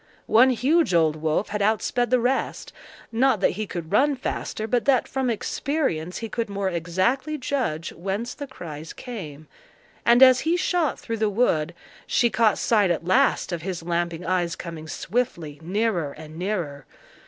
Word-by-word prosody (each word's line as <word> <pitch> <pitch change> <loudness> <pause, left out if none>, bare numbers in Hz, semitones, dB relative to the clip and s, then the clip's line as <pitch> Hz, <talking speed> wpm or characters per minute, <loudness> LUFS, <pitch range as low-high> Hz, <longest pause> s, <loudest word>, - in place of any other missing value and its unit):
One 245 +4 +6
huge 265 - +2
old 160 -2 +3
wolf 155 +5 -1
had 210 0 -2
outsped 220 +3 +1
the 255 0 +3
rest—not 250 -1 -1
that 195 - +3
he 215 +3 -4
could 170 -3 -6
run 280 +7 +3
faster, 245 -3 -4
but 240 +2 0
that 270 -3 +3
from 265 -2 -1
experience 225 - -2
he 225 - -4
could 230 0 -3
more 200 -1 -1
exactly 185 - 0
judge 250 - -2
whence 195 +7 -3
the 285 - -7
cries 160 - -8
came, 160 - -8 0.6
and 240 +2 +6
as 255 -1 +7
he 335 +2 +1
shot 350 -5 0
through 230 -1 -4
the 215 -1 +1
wood, 170 -7 +1 0.3
she 235 -1 +2
caught 225 -3 +3
sight 210 -5 +3
at 170 -1 -1
last 185 0 +2
of 170 -2 -3
his 180 -1 -4
lamping 170 0 -2
eyes 175 -2 0
coming 165 -2 -8
swiftly 170 -7 -3
nearer 180 -4 -1
and 155 0 -11
nearer. 170 -7 -3
205 Hz, 165 wpm, -24 LUFS, 170-245 Hz, 0.6 s, as